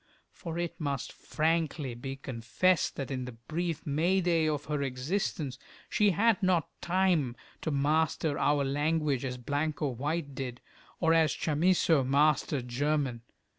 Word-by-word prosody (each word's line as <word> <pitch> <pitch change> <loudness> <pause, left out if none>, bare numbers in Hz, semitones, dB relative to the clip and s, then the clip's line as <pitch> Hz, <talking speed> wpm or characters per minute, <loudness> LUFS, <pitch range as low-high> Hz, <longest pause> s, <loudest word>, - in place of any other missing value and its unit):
For 165 -2 -6
it 175 -1 -3
must 140 -2 -2
frankly 155 -4 -1
be 135 +3 -6
confessed 135 +7 0
that 135 -1 -4
in 130 -1 -3
the 125 - -7
brief 160 +8 -4
May 165 +6 +2
day 170 -3 +2
of 150 -1 -1
her 150 -1 -2
existence 140 +1 -2 0.3
she 210 -1 +4
had 205 +4 +3
not 185 -4 +2
time 175 -8 +2 0.3
to - - -2
master 150 +1 +1
our 145 -1 +2
language 145 -1 0
as 125 -2 -3
Blanco 145 +3 -1
White 145 +4 -3
did, 125 -2 -5 0.4
or 165 -1 +3
as 160 -3 +3
Chamisso 160 -1 +3
mastered 140 -1 +2
German. 135 -1 0
150 Hz, 140 wpm, -30 LUFS, 135-165 Hz, 0.4 s, she